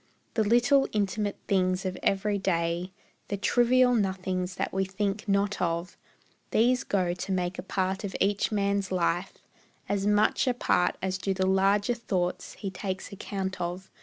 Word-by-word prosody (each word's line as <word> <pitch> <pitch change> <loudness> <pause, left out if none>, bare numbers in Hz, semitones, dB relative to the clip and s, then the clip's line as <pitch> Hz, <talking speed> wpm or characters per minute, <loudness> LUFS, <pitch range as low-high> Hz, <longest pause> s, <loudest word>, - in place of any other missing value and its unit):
The 220 - +2
little 245 +6 +4
intimate 205 0 0
things 185 -1 +1
of 185 0 -2
every 200 +1 +1
day, 170 -1 -1 0.4
The 200 - -2
trivial 245 +4 +4
nothings 190 -3 -1
that - - -3
we 190 0 +1
think 200 +2 -2
not 200 +1 +1
of, 170 0 -1 0.5
These 250 +4 +3
go 185 -6 0
to 180 +2 -5
make 180 0 -1
a - - -1
part 190 +1 -2
of 200 - -4
each 200 +2 +1
man's 200 -2 0
life; 180 0 0 0.5
As 200 0 0
much 210 +5 +3
a 250 - +2
part 180 -6 +2
as 190 0 -1
do 195 0 -1
the 190 0 +1
larger 195 +4 +3
thoughts 185 -6 -2
He 195 - -5
takes 190 0 -5
account 195 -1 -4
of. 180 +2 -4
195 Hz, 165 wpm, -28 LUFS, 185-205 Hz, 0.5 s, little